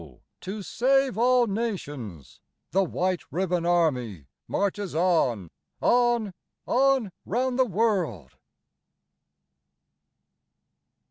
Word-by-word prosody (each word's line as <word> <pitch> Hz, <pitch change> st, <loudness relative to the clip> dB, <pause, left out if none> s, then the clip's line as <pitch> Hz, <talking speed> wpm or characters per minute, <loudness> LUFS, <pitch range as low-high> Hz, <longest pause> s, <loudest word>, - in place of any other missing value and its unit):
to 200 Hz, +2 st, -6 dB
save 270 Hz, +3 st, +2 dB
all 245 Hz, +2 st, +4 dB
nations 145 Hz, -, -5 dB, 0.3 s
the 195 Hz, +1 st, +3 dB
White 185 Hz, 0 st, -1 dB
Ribbon 180 Hz, -1 st, -1 dB
Army 125 Hz, -, 0 dB, 0.2 s
Marches 200 Hz, -3 st, -2 dB
on, 135 Hz, -, +1 dB, 0.3 s
on, 240 Hz, -4 st, +2 dB, 0.3 s
on 265 Hz, -5 st, +2 dB
round 255 Hz, +4 st, -1 dB
the 260 Hz, -, +5 dB
world. 185 Hz, -, -1 dB
195 Hz, 80 wpm, -26 LUFS, 160-235 Hz, 0.3 s, the